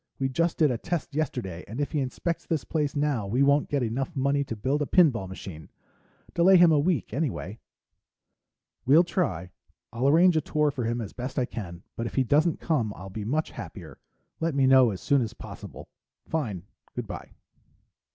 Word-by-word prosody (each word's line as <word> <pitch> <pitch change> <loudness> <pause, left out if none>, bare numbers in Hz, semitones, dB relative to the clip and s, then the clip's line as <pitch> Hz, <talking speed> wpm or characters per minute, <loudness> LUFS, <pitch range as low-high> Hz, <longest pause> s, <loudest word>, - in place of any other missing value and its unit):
We 135 -1 0
just 165 +5 0
did 150 -4 +4
a 120 - -2
test 175 -2 -3
yesterday 125 - -3
and 110 +6 -6
if 145 - -1
he 155 - 0
inspects 140 +6 -3
this 160 -3 -1
place 150 -3 -1
now, 145 -8 0
we 125 +7 +2
won't 140 +1 +3
get 140 -3 0
enough 130 +8 -2
money 140 +1 +1
to 115 - -5
build 135 +7 -1
a 145 - 0
pinball 130 - +3
machine. 85 -4 -9 0.6
Delay 185 +3 +6
him 175 -1 +7
a 150 - +4
week, 150 - 0
anyway.... 125 - -3 1.2
"Well, 150 +7 +6
try. 115 - -2 0.4
I'll 120 +4 +1
arrange 170 +4 +5
a 155 - +3
tour 150 0 +1
for 125 -4 -3
him 120 +1 -1
as 105 - -7
best 130 +3 -6
I 130 - +2
can, 90 -8 -7
but 115 - -3
if - - -8
he 135 - +3
doesn't 155 +6 +2
come, 130 -11 0
I'll 95 +1 -9
be 105 +1 -5
much 155 +7 -1
happier. - - -9 0.4
Let 165 -2 -1
me 135 -1 +3
know 130 -2 +6
as 95 -4 -5
soon 140 -2 +3
as 110 -3 -4
possible. - - -10 0.4
Fine. 110 - -2 0.3
Good - - -3
by." - - -8
135 Hz, 195 wpm, -27 LUFS, 115-155 Hz, 1.2 s, him